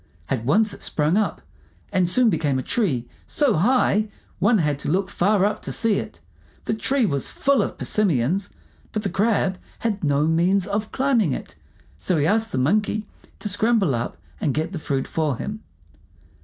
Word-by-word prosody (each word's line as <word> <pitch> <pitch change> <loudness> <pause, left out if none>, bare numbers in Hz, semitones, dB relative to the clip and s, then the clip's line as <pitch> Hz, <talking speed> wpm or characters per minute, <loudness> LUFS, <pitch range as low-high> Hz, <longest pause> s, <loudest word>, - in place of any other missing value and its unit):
At 125 -4 -1
once 205 - +3
it - - -11
sprung 150 +3 +1
up, 215 0 0 0.5
and 180 -2 +2
soon 240 +3 +4
became 150 -5 0
a 130 - -2
tree 135 - 0 0.2
so 285 -6 +2
high 215 +2 +2 0.3
one 215 +3 +4
had 150 -5 0
to - - -3
look 190 +4 0
far 200 +1 +2
up 210 - -1
to - - -5
see 225 -3 +2
it. 85 - -8 0.5
The - - 0
tree 255 +3 +1
was 140 -8 -1
full 280 0 +2
of - - -3
persimmons, 180 - 0 0.4
but 215 - -2
the 195 - -1
Crab 200 -3 +1 0.2
had 210 -4 -2
no 145 0 +2
means 175 +4 +2
of 205 +2 -3
climbing 245 - +2
it, - - -6 0.5
so 175 - 0
he 145 - +2
asked 225 +4 +1
the - - -2
Monkey 210 +9 +1 0.3
to - - -4
scramble 205 - +2
up 120 0 -3 0.2
and 140 - 0
get 160 +3 -1
the 180 - -4
fruit 135 -3 -2
for 155 -6 -1
him. 210 - -5
195 Hz, 185 wpm, -23 LUFS, 150-215 Hz, 0.5 s, soon